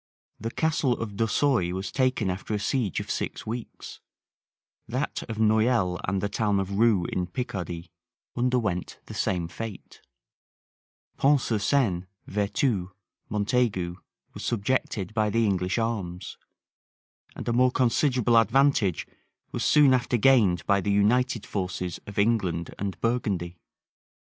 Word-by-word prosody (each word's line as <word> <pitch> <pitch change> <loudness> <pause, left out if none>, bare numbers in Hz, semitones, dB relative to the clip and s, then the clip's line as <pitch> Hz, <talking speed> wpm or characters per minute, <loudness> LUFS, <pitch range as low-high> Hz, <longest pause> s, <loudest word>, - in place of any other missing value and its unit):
The 115 - -3
Castle 150 -1 +1
of 115 -3 -4
Dorsoy 115 -3 +1
was 95 +1 -4
taken 130 -7 +1
after 100 +3 -4
a - - -1
siege 115 - -1
of - - -5
six - - -3
weeks: 115 +1 -7 0.9
that - - -2
of 110 - -4
Noyelle 110 -4 +2
and 95 0 -1
the 100 - 0
town 105 -1 0
of 100 +1 -2
Rue, 110 -6 +4
in 90 0 -2
Picardy, 90 -5 -5 0.4
underwent 120 -8 0
the - - -9
same 90 -3 -1
fate: 110 +3 -8 1.2
Pont 140 +1 +4
sur 115 -3 -1
Seine, 100 -7 +1 0.2
Vertus, 100 0 0 0.4
Montaigu, 100 -4 0 0.4
were - - -9
subjected 110 -3 -1
by 110 -2 +1
the 115 +2 +2
English 95 -1 0
arms: 100 -6 -3 1.0
and - - -7
a 120 - +1
more 125 +2 +4
considerable 125 -1 +2
advantage 115 - +2 0.5
was - - -3
soon 145 -3 +5
after 125 -1 +1
gained 105 -8 +4
by 100 0 +3
the 100 - 0
united 115 +3 +2
forces 90 -2 -3
of 100 - -9
England 100 -6 +1
and 95 -3 -3
Burgundy. 100 -8 -1
105 Hz, 135 wpm, -26 LUFS, 95-120 Hz, 1.2 s, soon